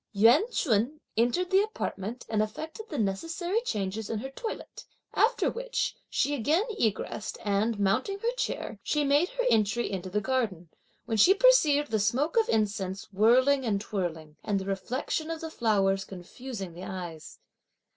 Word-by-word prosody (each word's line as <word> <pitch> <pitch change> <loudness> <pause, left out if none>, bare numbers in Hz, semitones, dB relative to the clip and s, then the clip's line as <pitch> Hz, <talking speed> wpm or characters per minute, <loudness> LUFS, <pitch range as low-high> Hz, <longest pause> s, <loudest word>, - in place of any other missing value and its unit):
Yuan 235 - +5
Ch'un 250 - +1 0.2
entered 245 - +1
the 385 +1 +6
apartment 245 - -4
and 215 -1 +1
effected 315 - -5
the 295 - -4
necessary 330 - -1
changes 210 - -3
in 225 - -1
her 265 +5 -5
toilette; 445 - -7 0.3
after 465 +3 +3
which, - - -2
she 290 - +1
again 295 - +2 0.2
egressed, 215 0 -1
and, 205 +2 +1
mounting 255 - +1
her 465 +4 -1
chair, 230 - -3
she 300 +6 0
made 290 +5 +3
her - - -2
entry 220 +2 +2
into 190 -1 -4
the 210 +3 0
garden, 215 -8 -1 0.4
when 225 - -1
she 365 - +7
perceived 310 - +4
the 220 - +2
smoke 250 +10 +1
of 455 -1 +3
incense 200 -3 -1
whirling 255 +7 +4
and 210 -5 0
twirling, 170 -7 -4
and 205 -2 0
the 190 - -6
reflection 250 +10 -2
of 330 -1 -3
the 320 0 -6
flowers 195 -6 +1
confusing 195 +1 -8
the 175 +2 -9
eyes. 175 -5 -7
225 Hz, 160 wpm, -28 LUFS, 200-310 Hz, 0.4 s, she